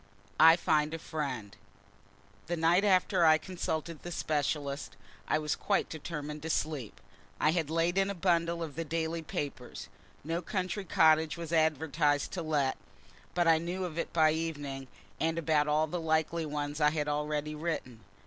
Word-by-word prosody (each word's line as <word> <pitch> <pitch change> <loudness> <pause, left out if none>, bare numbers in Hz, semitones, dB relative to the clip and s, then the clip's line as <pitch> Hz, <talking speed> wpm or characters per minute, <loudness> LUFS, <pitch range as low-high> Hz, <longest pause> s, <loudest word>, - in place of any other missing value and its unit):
I 165 +1 +9
FIND 155 -2 +1
A - - -3
FRIEND 135 -10 -5 0.9
The 175 - -1
night 170 +4 +3
after 185 -2 +3
I 155 -1 +7
consulted 165 -2 -4
the 175 - -7
specialist 145 -3 -2 0.3
I - - +2
was 150 -1 -1
quite - - 0
determined 150 -1 -6
to 160 - -5
sleep. 150 -8 -2 0.4
I 155 - +4
had 160 -3 -1
laid 165 +3 +1
in 195 0 +2
a 200 - -3
bundle 170 -1 +1
of 155 -3 -6
the 165 - -2
daily 165 +1 -2
papers. 140 -5 -6 0.3
No 165 +3 -2
country 185 +2 -3
cottage 160 -1 +4
was 170 -1 -5
advertised 150 -2 +2
to 180 - -3
let 150 -4 0 0.6
but 175 -1 +2
I 165 -1 +5
knew 180 +3 -3
of 170 -2 -5
it - - -3
by 155 -2 +4
evening, 145 -4 -4 0.3
and 165 +1 0
about 155 -2 +2
all 150 +1 +3
the 170 +2 -4
likely 160 0 0
ones 145 0 -3
I 150 - +6
had 150 -1 -2
already 150 0 -1
written. 150 -7 -4
160 Hz, 170 wpm, -31 LUFS, 150-170 Hz, 0.9 s, I